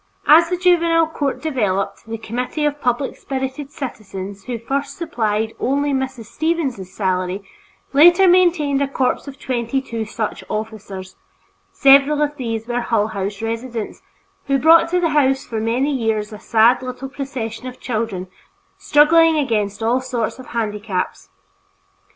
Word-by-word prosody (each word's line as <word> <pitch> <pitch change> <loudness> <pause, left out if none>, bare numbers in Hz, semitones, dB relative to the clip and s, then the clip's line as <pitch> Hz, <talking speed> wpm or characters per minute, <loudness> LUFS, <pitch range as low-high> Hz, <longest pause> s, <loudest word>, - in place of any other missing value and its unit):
As 330 +3 +6
the 360 - 0
Juvenile 335 -2 +3
Court 295 -3 -3
developed, 210 -11 -1
the 225 0 -4
committee 250 +7 -3
of 295 0 -1
public 250 +2 -1
spirited 265 +1 -5
citizens 200 -8 -7
who 245 -2 -3
first 275 +5 -3
supplied 220 -8 -1
only 285 +2 0
Mrs. 265 -3 -3
Stevens' 275 - -2
salary 185 0 -2 0.5
later 350 +6 +7
maintained 345 -6 +3
a 280 - +1
corps 265 0 -1
of 275 -1 -8
twenty 250 0 -2
two 230 -4 -5
such 215 0 -4
officers; 215 -3 -6 0.5
several 275 +1 +5
of 295 0 -2
these 225 -4 -3
were 245 0 -1
Hull 220 -3 0
House 200 0 -4
residents 230 0 -4 0.5
who 275 -1 +2
brought 330 +4 +6
to 360 +1 +1
the 340 -2 +1
house 270 -2 +2
for 225 -2 -4
many 245 +6 0
years 220 -4 -1
a 210 - -9
sad 235 +3 +4
little 255 +1 -6
procession 255 -3 -5
of 255 - -9
children 215 -6 -3 0.5
struggling 320 +2 +5
against 220 -7 -1
all 240 +3 +2
sorts 250 -2 -3
of 260 - -10
handicaps. 210 - -3
255 Hz, 145 wpm, -20 LUFS, 220-290 Hz, 0.5 s, later